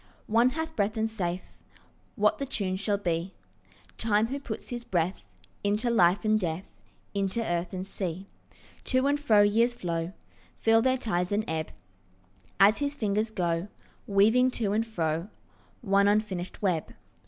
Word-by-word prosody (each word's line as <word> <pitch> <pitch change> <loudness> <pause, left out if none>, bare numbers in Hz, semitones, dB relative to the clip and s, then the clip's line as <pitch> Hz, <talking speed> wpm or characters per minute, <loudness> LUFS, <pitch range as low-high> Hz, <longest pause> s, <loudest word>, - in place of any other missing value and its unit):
One 230 +3 +4
hath 320 +3 -4
breath 210 +2 0
and 220 0 +1
saith 185 -5 -4 0.6
What 320 - +2
the 275 - -1
tune 195 -7 -1
shall 205 +1 0
be— 175 -1 -2 0.6
Time, 215 -1 +2
who 275 +2 -3
puts 235 -6 -6
his 240 -1 -4
breath 180 - -1 0.4
Into 210 +4 +1
life 195 -1 +3
and 215 0 +3
death, 175 -1 -3 0.4
Into 200 +2 -1
earth 175 -1 -1
and 185 0 -4
sea. 190 -1 -4 0.6
To 260 0 +2
and 285 +1 +2
fro 220 -8 +5
years 230 +4 +3
flow, 170 -4 -3 0.4
Fill 225 0 +4
their 260 +2 +2
tides 180 -7 -1
and 210 +1 +1
ebb, 160 -1 -2 0.9
As 205 +2 +6
his 285 0 -1
fingers 215 -2 0
go 175 -3 -1 0.4
Weaving 220 +6 +4
to 205 -4 0
and 225 +2 0
fro 165 -4 -1 0.5
One 200 -3 +3
unfinished 205 -3 -1
web. 175 -5 0
205 Hz, 155 wpm, -28 LUFS, 180-230 Hz, 0.9 s, As